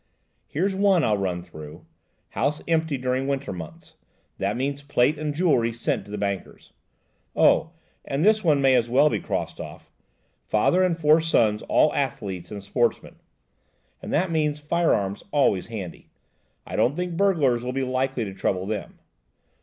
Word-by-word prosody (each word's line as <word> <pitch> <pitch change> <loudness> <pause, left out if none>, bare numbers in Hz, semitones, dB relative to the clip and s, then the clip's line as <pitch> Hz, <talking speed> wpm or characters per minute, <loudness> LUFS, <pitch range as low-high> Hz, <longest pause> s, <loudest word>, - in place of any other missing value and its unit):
Here's 190 +6 -1
one 195 -3 +3
I'll 105 - +2
run 90 -3 -2
through, 75 -4 -11 0.4
'house 145 +3 -1
empty 160 -3 +1
during 130 +1 -1
winter 140 -6 -2
months,' 85 -3 -10 0.4
that 100 +3 -1
means 140 +2 -2
plate 145 +1 +1
and 155 -1 -2
jewellery 145 -8 +2
sent 115 0 -2
to 105 - -12
the 105 - -4
bankers. 100 -2 -5 0.6
Oh! 160 +1 +3 0.3
and 140 +5 -1
this 215 0 +4
one 150 -5 +3
may 135 -1 +5
as 120 -2 +2
well 135 +5 +5
be - - 0
crossed - - -4
off, - - -11 0.6
'father 110 +12 +3
and 180 -3 +2
four 155 0 +4
sons 110 -10 +2
all - - +4
athletes 90 -3 -3
and 100 -2 -7
sportsmen,' 120 +4 -1 0.8
that 170 +3 0
means 150 -2 0
firearms 150 - 0
always 135 - +2
handy–I 100 -7 -11
don't 135 - +2
think 180 0 -3
burglars 155 -11 +2
will 125 - -3
be 135 +1 -2
likely 130 -1 -1
to 95 - -6
trouble 95 -1 -1
them. 105 0 -5
135 Hz, 155 wpm, -24 LUFS, 105-160 Hz, 0.8 s, may